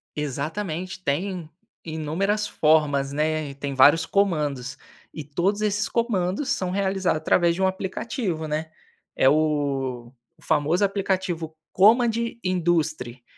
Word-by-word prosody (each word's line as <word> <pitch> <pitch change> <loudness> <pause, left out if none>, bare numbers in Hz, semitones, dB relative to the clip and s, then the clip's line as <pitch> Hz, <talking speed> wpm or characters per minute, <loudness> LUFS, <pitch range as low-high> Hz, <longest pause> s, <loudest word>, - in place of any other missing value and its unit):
Exatamente, 160 +5 -4
tem 170 +2 -2 0.4
inúmeras 170 +7 -1
formas, 145 -3 +2
né, 155 0 -1
e - - -12
tem 140 0 -4
vários 145 +5 +6
comandos, 150 -10 0 0.4
e 155 - -6
todos 180 +9 -1
esses 210 +1 0
comandos 230 +2 -1
são 185 -10 -1
realizados 190 -4 0
através 170 +1 +3
de 190 - -4
um 190 - +4
aplicativo, 190 - -3
né, 155 +1 -3 0.5
é 130 - +5
o 140 -5 0 0.3
famoso 160 +5 +1
aplicativo 185 -5 -1 0.2
Command 230 +5 +5 0.3
Industry. 160 -9 -1
165 Hz, 115 wpm, -24 LUFS, 150-190 Hz, 0.5 s, vários